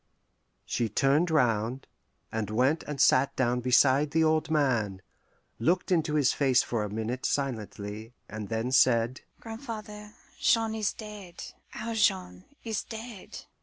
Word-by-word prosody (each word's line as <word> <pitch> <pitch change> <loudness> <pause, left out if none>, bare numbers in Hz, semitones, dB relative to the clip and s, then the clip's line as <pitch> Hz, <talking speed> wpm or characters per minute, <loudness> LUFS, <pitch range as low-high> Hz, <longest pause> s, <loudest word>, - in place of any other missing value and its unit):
'" - - -47 0.2
She 115 -2 -1
turned 140 - +2
round, 125 -4 +1 0.5
and 110 -2 -3
went 130 +9 +2
and 150 -2 -5
sat 130 +2 +4
down 125 -1 +1
beside 130 +3 +4
the 160 +2 +2
old 155 0 +2
man, 120 -11 0 0.6
looked 175 +11 +1
into 160 -3 +1
his 145 -3 +3
face 130 -3 +3
for 115 -3 -2
a 105 - -4
minute 110 +4 -4
silently, 110 -4 -3
and 105 -1 -7
then 115 +2 -2
said, 125 -1 +3 0.2
"Grandfather, 215 -3 -8 0.3
Jean 225 -1 +2
is 215 -2 0
dead; 210 -5 -10 0.3
our 230 +1 -4
Jean 90 - 0 0.2
is 225 -2 -2
dead." 225 -3 -9
135 Hz, 140 wpm, -28 LUFS, 115-180 Hz, 0.6 s, sat